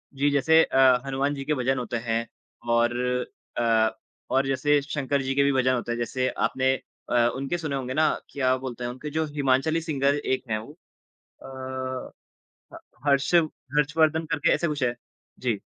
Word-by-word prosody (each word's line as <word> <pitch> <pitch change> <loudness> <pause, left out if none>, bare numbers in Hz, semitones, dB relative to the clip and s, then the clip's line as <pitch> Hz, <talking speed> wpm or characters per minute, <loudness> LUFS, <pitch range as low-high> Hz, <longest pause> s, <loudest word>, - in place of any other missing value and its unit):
जी, 145 +2 +2
जैसे 160 +4 +5
अ, 130 -2 +4
हनुमान 135 +1 0
जी 135 - -5
के 150 - +1
भजन 130 0 0
होते 120 0 -3
हैं 115 0 0 0.5
और 120 +1 +3 0.6
अ, 115 -2 +3 0.4
और 135 +1 +2
जैसे 145 +2 +2
शंकर 140 -1 -1
जी 135 0 -1
के 140 - +4
भी 140 - +3
भजन 130 0 +3
होते 120 -1 -2
हैं, 120 - -1
जैसे 130 +2 -1 0.2
आपने 130 0 +1 0.4
अ, 120 -1 +4
उनके 135 +6 -2
सुने 155 -4 -3
होंगे 130 -1 -3
ना 155 +1 +3 0.2
क्या 130 -2 +1
बोलते 125 -2 -6
हैं 120 - -2
उनके 130 +4 -7
जो 160 +2 -1
हिमांचली 145 +3 +1
सिंगर 140 -3 +1
एक 130 -3 -1
हैं 110 - +1
वो 140 +7 -11 0.7
अ, 130 -1 -6 0.6
ह - - -8 0.3
हर्षव 145 +4 +4 0.3
हर्षवर्धन 155 +2 +2
करके 150 - +2
ऐसा 170 - 0
कुछ 150 -2 -3
हैं। 120 -1 +1 0.4
जी। - - -1
135 Hz, 175 wpm, -26 LUFS, 130-145 Hz, 0.7 s, जैसे